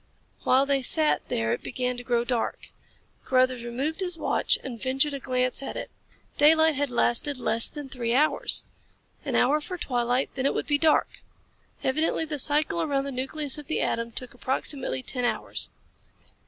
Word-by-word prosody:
While 265 Hz, +2 st, +4 dB
they 275 Hz, -1 st, +1 dB
sat 305 Hz, +4 st, +3 dB
there 115 Hz, 0 st, 0 dB
it -, -, -3 dB
began 250 Hz, 0 st, -2 dB
to 245 Hz, -, -8 dB
grow 240 Hz, -1 st, +1 dB
dark. 240 Hz, -1 st, -3 dB, 0.5 s
Carruthers 255 Hz, -2 st, +2 dB
removed 265 Hz, +8 st, -3 dB
his 360 Hz, -3 st, -2 dB
watch -, -, +1 dB
and 240 Hz, -4 st, -7 dB
ventured 270 Hz, +3 st, +1 dB
a 280 Hz, -, -4 dB
glance 255 Hz, 0 st, 0 dB
at 275 Hz, -, -5 dB
it. -, -, -6 dB, 0.5 s
Daylight 315 Hz, +2 st, +6 dB
had 285 Hz, 0 st, -1 dB
lasted 245 Hz, +3 st, +1 dB
less 230 Hz, -2 st, +2 dB
then 295 Hz, -2 st, -7 dB
three 240 Hz, -2 st, -2 dB
hours. 300 Hz, +3 st, +4 dB, 0.6 s
An -, -, -3 dB
hour 290 Hz, +5 st, +3 dB
for 365 Hz, +4 st, -6 dB
twilight, 245 Hz, -3 st, 0 dB
then 265 Hz, 0 st, 0 dB
it -, -, -1 dB
would -, -, -1 dB
be 290 Hz, -1 st, +1 dB
dark. 315 Hz, -1 st, +2 dB, 0.6 s
Evidently 310 Hz, +4 st, +1 dB
the 300 Hz, -2 st, -3 dB
cycle 300 Hz, +4 st, +3 dB
around 280 Hz, -4 st, 0 dB
the 280 Hz, -, -4 dB
nucleus 270 Hz, +3 st, -3 dB
of 295 Hz, -, -11 dB
the -, -, -1 dB
atom 230 Hz, 0 st, -1 dB
took 250 Hz, +2 st, -5 dB
approximately 255 Hz, -, -3 dB
ten 250 Hz, -2 st, -3 dB
hours. 245 Hz, -, -1 dB
265 Hz, 175 wpm, -26 LUFS, 250-295 Hz, 0.6 s, Daylight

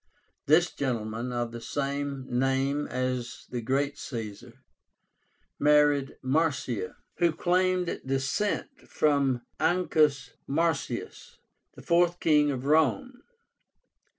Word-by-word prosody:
This 165 Hz, +4 st, +4 dB
gentleman, 115 Hz, -2 st, -3 dB
of 120 Hz, -1 st, -2 dB
the 120 Hz, 0 st, -7 dB
same 140 Hz, 0 st, -3 dB
name 135 Hz, +3 st, 0 dB
as 130 Hz, -1 st, -3 dB
the 120 Hz, -1 st, -3 dB
great 140 Hz, +4 st, -1 dB
Caesar, 110 Hz, -6 st, -7 dB, 1.0 s
married 145 Hz, -2 st, +3 dB
Marcia, 130 Hz, -, 0 dB, 0.2 s
who 170 Hz, -1 st, +3 dB
claimed 180 Hz, +2 st, 0 dB
descent 135 Hz, +10 st, -2 dB
from 140 Hz, -5 st, +1 dB, 0.2 s
Ancus 155 Hz, -7 st, +2 dB, 0.2 s
Marcius, 165 Hz, +3 st, -2 dB, 0.4 s
the -, -, -12 dB
fourth 175 Hz, +1 st, +2 dB
King 150 Hz, -2 st, +4 dB
of 130 Hz, -2 st, -3 dB
Rome. 245 Hz, -, +2 dB
140 Hz, 95 wpm, -28 LUFS, 130-160 Hz, 1.0 s, This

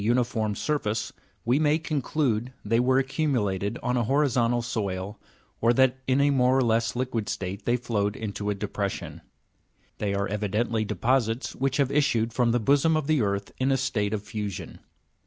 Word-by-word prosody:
167 115 Hz, -2 st, +1 dB
surface, 115 Hz, -8 st, -2 dB, 0.3 s
we 125 Hz, +5 st, +3 dB
may 150 Hz, 0 st, +3 dB
conclude 140 Hz, -6 st, -1 dB
they 115 Hz, +3 st, +2 dB
were 130 Hz, +1 st, +3 dB
accumulated 120 Hz, -, 0 dB
on 125 Hz, 0 st, 0 dB
a 120 Hz, -, +1 dB
horizontal 120 Hz, -3 st, +2 dB
soil, 100 Hz, -3 st, -3 dB, 0.4 s
or 115 Hz, +1 st, +4 dB
that 130 Hz, +1 st, +3 dB
in 130 Hz, +1 st, +3 dB
a 145 Hz, 0 st, +4 dB
more 130 Hz, -1 st, +3 dB
or 135 Hz, -, +3 dB
less 115 Hz, 0 st, +1 dB
liquid 120 Hz, -4 st, -2 dB
state 95 Hz, +2 st, -4 dB
they 120 Hz, +1 st, +2 dB
flowed 105 Hz, -4 st, -1 dB
into 105 Hz, -1 st, -4 dB
a 105 Hz, -, 0 dB
depres 100 Hz, 0 st, -2 dB
sion. -, -, -8 dB, 0.8 s
They 100 Hz, -1 st, -1 dB
are 100 Hz, 0 st, 0 dB
evidently 105 Hz, +2 st, -1 dB
deposits 120 Hz, +1 st, 0 dB
which 135 Hz, 0 st, 0 dB
have 140 Hz, -2 st, +2 dB
issued 120 Hz, -6 st, +1 dB
from 120 Hz, -2 st, +2 dB
the 120 Hz, -, +2 dB
bosom 145 Hz, +7 st, +3 dB
of 155 Hz, -, -2 dB
the 155 Hz, -2 st, +2 dB
earth 100 Hz, -1 st, -1 dB
in 130 Hz, +1 st, +2 dB
a 135 Hz, -, +3 dB
state 115 Hz, -6 st, -1 dB
of 105 Hz, -2 st, -2 dB
fusion. 105 Hz, -2 st, -5 dB
120 Hz, 175 wpm, -26 LUFS, 105-130 Hz, 0.8 s, or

